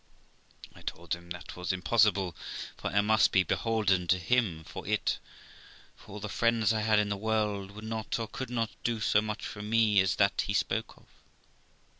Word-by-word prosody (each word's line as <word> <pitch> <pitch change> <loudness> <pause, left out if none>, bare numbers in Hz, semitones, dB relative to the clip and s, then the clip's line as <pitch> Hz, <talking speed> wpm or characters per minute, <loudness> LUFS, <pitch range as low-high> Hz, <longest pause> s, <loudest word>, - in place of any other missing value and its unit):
I - - -15
told 85 - -4
him 85 0 -7
that 90 +1 -7
was 90 -1 -2
impossible, 100 -1 +2 0.4
for - - -5
I 100 - +3
must 110 +1 +4
be 95 - +4
beholden 100 -5 +1
to 95 - +4
him 95 -4 0
for 85 +1 -9
it, 105 0 0 0.8
for - - -14
all 105 - -6
the 105 - -5
friends 115 +1 +2
I 110 - 0
had 110 0 +3
in 105 -1 +2
the 100 - 0
world 105 -2 -1
would 105 +2 -10
not 110 -1 -3
or 115 -1 -3
could 130 +3 -6
not 115 -3 -1
do 115 -1 0
so 105 -1 +3
much 105 -1 -4
for 105 - -6
me 105 -2 +3
as 95 -1 +1
that - - +2
he - - -1
spoke - - -1
of. - - -21
105 Hz, 195 wpm, -30 LUFS, 95-110 Hz, 0.8 s, must